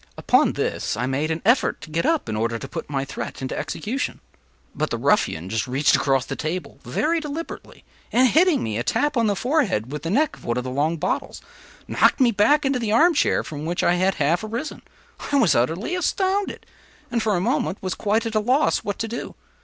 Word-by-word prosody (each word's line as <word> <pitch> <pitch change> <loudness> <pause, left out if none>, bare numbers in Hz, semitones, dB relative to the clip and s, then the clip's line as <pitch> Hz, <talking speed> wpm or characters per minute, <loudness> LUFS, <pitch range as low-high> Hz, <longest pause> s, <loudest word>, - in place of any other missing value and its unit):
Upon - - +3
this - - -2
I 125 - -1
made 135 +4 -1
an 160 0 -3
effort 235 +5 +3
to 160 - -10
get 165 +2 0
up, 325 -2 +1
in 110 - -3
order 115 +2 -1
to - - -7
put - - -6
my 135 -2 -1
threat 140 - -6
into 130 - -4
execution; 235 - -3 0.5
but - - -2
the - - -2
ruffian 80 +3 +1
just 110 +4 -2
reached 135 +4 +3
across 135 -2 +1
the - - -4
table 165 +3 -4
very 310 - 0
deliberately, 315 +1 -7 0.3
and 255 +2 +5
hitting 325 +4 +3
me 110 0 -2
a - - -1
tap 295 - 0
on 230 -2 +2
the 205 - +1
forehead 220 - 0
with 150 - -4
the 165 - -4
neck 285 - +1
of - - -18
one 120 +1 -1
of 125 - -1
the 130 - -5
long 150 +5 0
bottles, - - -2 0.5
knocked - - +3
me 250 -3 +5
back 280 +8 +3
into 270 -2 +1
the 225 -3 -2
arm 330 +10 +5
chair 300 - +2
from 150 -1 -7
which 170 +2 -2
I 175 - +4
had 185 +2 +1
half 160 +6 +1
arisen. 230 +8 -5 0.5
I - - +2
was 225 - +4
utterly 160 - 0
astounded; 380 +2 -1 0.5
and, 235 -1 0
for 215 -2 +1
a - - +1
moment, 240 -1 0
was 185 -1 -3
quite 220 +2 0
at 225 - -3
a 215 - +3
loss 255 +8 +2
what 205 - -4
to 225 - -3
do. 235 +2 -6
205 Hz, 225 wpm, -23 LUFS, -, 0.5 s, and